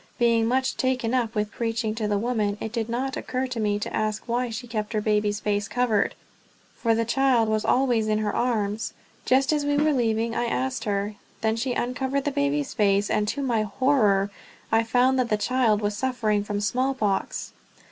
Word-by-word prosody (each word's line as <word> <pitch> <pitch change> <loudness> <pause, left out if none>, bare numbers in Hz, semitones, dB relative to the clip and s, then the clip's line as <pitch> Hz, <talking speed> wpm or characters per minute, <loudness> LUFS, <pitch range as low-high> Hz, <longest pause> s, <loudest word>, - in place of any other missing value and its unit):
Being 230 -1 +3
much 260 +2 0
taken 255 -3 0
up 235 -3 0
with 210 0 -1
preaching 225 -1 -2
to 220 -1 -2
the 205 -1 +1
women, 210 -2 0
it 220 - -4
did 230 -1 -2
not 260 +3 -2
occur 255 +1 -2
to 250 -3 -4
me 205 -1 +1
to 210 - -4
ask 215 0 -1
why 245 +1 0
she 230 +2 -5
kept 215 -2 -4
her 215 - +1
baby's 210 -1 +1
face 205 -1 -1
covered, 240 -4 +1 0.6
for 230 -1 +1
the 230 0 0
child 250 -1 +3
was 215 0 0
always 245 -4 +2
in 215 0 +2
her 215 -1 -1
arms. 220 -2 -1 0.3
Just 270 +3 +3
as 295 -1 +1
we 290 0 +1
were 300 +1 +3
leaving 230 -2 0
I 240 - 0
asked 255 0 -2
her; 205 0 -2 0.2
then 220 0 +1
she 245 +2 -1
uncovered 265 +3 -1
the 290 - +1
baby's 285 0 0
face, 205 -2 +2
and 210 0 +1
to 280 +6 -2
my 235 -4 +1
horror 210 -3 +2 0.4
I 225 - +4
found 250 +3 +2
that 245 -2 +1
the 215 - +2
child 225 -2 +2
was 205 0 -1
suffering 220 -4 0
from 205 0 -3
smallpox! 245 -2 -1
230 Hz, 200 wpm, -25 LUFS, 210-255 Hz, 0.6 s, I